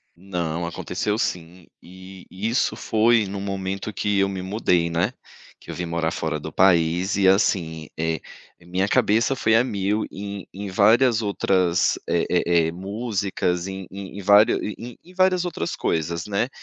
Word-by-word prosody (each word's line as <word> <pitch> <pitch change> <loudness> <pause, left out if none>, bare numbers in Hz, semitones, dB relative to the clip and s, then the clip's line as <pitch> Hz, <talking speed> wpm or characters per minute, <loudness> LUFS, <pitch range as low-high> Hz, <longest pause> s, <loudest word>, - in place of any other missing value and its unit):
Não, 85 -2 -3
aconteceu 105 +5 -3
sim, 90 -4 -4
e 95 +1 -13
e 95 +4 -4
isso 120 - +1
foi 115 0 +2
no 100 0 -5
momento 95 +1 -4
que 105 +1 0
eu 100 - +3
me 95 -1 -4
mudei, 90 -3 +1
né. 90 +8 0 0.5
Que - - -10
eu - - -7
vim 90 - -3
morar 85 -1 -1
fora 80 -2 -3
do 80 +2 -7
país 90 +1 +3
e 95 -1 +3
assim, 85 -6 +1
eh, 80 0 -1 0.4
minha 90 +3 -1
cabeça 115 +6 +2
foi 110 -3 +2
a 115 - +5
mil 105 -2 -1
em 100 0 -7
em 100 +1 -6
várias 110 +5 +4
outras 95 -4 +1
eh - - +1
eh 85 -2 +2
eh, - - -2
músicas, 95 -2 -2
em 95 -1 -6
em 100 +1 -8
em - - -5
vár 100 +2 +7
em 115 +3 -4
em 180 - -17
várias 185 -1 +2
outras 170 - -3
coisas, 85 +1 -2
né. 105 +3 0
95 Hz, 170 wpm, -23 LUFS, 85-105 Hz, 0.5 s, vár